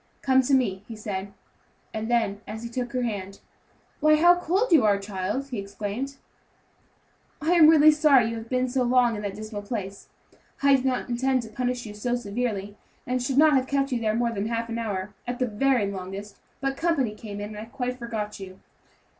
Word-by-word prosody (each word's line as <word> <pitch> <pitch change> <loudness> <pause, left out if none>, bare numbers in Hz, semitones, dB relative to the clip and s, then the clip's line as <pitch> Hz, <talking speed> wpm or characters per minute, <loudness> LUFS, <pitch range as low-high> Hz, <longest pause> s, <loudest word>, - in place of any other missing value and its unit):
"Come 265 -1 +4
to 270 +2 +2
me," 200 -7 0
he 230 - -7
said; 200 -2 -5 0.6
and 220 +1 -3
then, 220 -4 +1
as 220 +2 -6
he 235 - -5
took 245 0 -4
her 250 -1 0
hand, 200 -4 -4 0.6
"Why, 305 0 +5
how 345 +3 +6
cold 365 +6 0
you 310 -8 +6
are, 205 -2 +4
child," 200 +7 -3
he 245 -5 -4
exclaimed; 205 +7 -5 1.2
"I 315 +2 0
am 340 -3 +7
really 310 -1 +8
sorry 300 -5 +5
you 230 - -4
have 225 0 -8
been 255 0 +1
so 255 +1 0
long 245 -1 +3
in 210 - -5
that 200 -2 -4
dismal 215 -1 -6
place. 200 -2 -6 0.5
I 280 -1 +6
did 265 -1 -1
not 255 -1 0
intend 255 +1 0
to 225 - -9
punish 245 +2 -2
you 210 - -7
so 240 +4 -1
severely, 205 -3 -3 0.3
and 255 0 -1
should 260 +2 -1
not 310 +1 +6
have 265 -1 +2
kept 275 0 0
you 245 -2 -1
there 215 -1 +1
more 235 0 +1
than 205 -1 -2
half 230 0 -2
an 230 0 -3
hour, 205 -3 -3
at 245 0 -3
the 255 - +1
very 245 0 +1
longest; 195 +2 -7 0.2
but 270 0 -1
company 295 -10 +1
came 210 -1 -8
in, 205 0 -5
and - - -7
I 215 - -6
quite 250 +1 -4
forgot 220 -3 -4
you." 190 -1 -10
235 Hz, 210 wpm, -26 LUFS, 210-265 Hz, 1.2 s, really